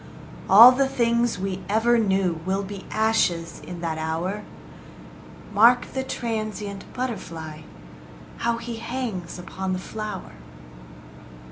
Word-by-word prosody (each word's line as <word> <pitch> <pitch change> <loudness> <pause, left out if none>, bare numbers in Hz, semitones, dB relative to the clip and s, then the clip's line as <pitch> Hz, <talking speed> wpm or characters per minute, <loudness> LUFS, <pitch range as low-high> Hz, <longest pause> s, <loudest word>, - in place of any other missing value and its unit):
All 230 +6 +11
the 270 +1 +2
things 235 -3 +1
we 190 0 -3
ever 230 +3 +3
knew 190 -5 +1
Will 190 +2 -1
be 200 0 -8
ashes 215 -7 +1
in 175 -1 -8
that 160 -2 -2
hour: 165 +6 -2 1.1
Mark 235 +4 +5
the 265 - -1
transient 215 -5 -4
butterfly, 165 -11 -5 0.8
How 235 0 0
he 230 0 -6
hangs 225 -8 -4
upon 185 +1 -4
the - - -1
flower. 210 +1 -6
205 Hz, 115 wpm, -24 LUFS, 185-235 Hz, 1.1 s, All